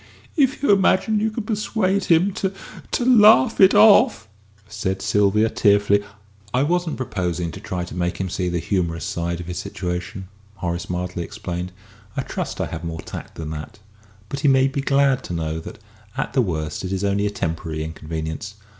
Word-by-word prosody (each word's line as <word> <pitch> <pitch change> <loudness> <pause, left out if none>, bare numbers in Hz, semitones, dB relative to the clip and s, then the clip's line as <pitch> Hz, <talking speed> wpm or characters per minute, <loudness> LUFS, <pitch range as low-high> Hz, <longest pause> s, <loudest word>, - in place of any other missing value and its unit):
"If 275 -3 +2
you 285 - +4
imagine 200 +2 +3
you 220 +1 +1
can 220 +1 -4
persuade 205 -2 0
him 180 +4 +3
to 190 0 -1 0.4
to 245 - -1
laugh 225 -1 +6
it 190 +1 +7
off!" 215 - +6 0.4
said 105 -2 -3
Sylvia, 105 +2 +2
tearfully. 105 -3 +3 0.5
"I 130 - +3
wasn't 175 +1 0
proposing 90 -8 -2
to - - -9
try 90 -1 -4
to 90 - -8
make 90 0 -2
him 95 - -2
see 90 0 -2
the 85 - -1
humorous 85 -2 -1
side 85 0 -2
of 85 - -6
his 90 +1 -5
situation," 90 +1 -5 0.3
Horace 85 -2 -4
mildly 90 0 -3
explained. 90 -2 -5 0.5
"I - - 0
trust - - -5
I - - 0
have 85 0 -6
more 80 -1 -5
tact - - -9
than 80 -1 -6
that. 80 +8 -7 0.5
But 140 - -4
he 145 - +1
may 135 -1 +5
be 140 +1 -2
glad 135 -1 +2
to - - -5
know 80 -1 -2
that, - - -9 0.4
at - - -2
the 135 - +3
worst, 80 -7 -3
it 95 - -4
is 95 0 -2
only 100 +1 +1
a - - 0
temporary 80 -4 -3
inconvenience. 80 +5 -5
100 Hz, 185 wpm, -22 LUFS, -, 0.5 s, it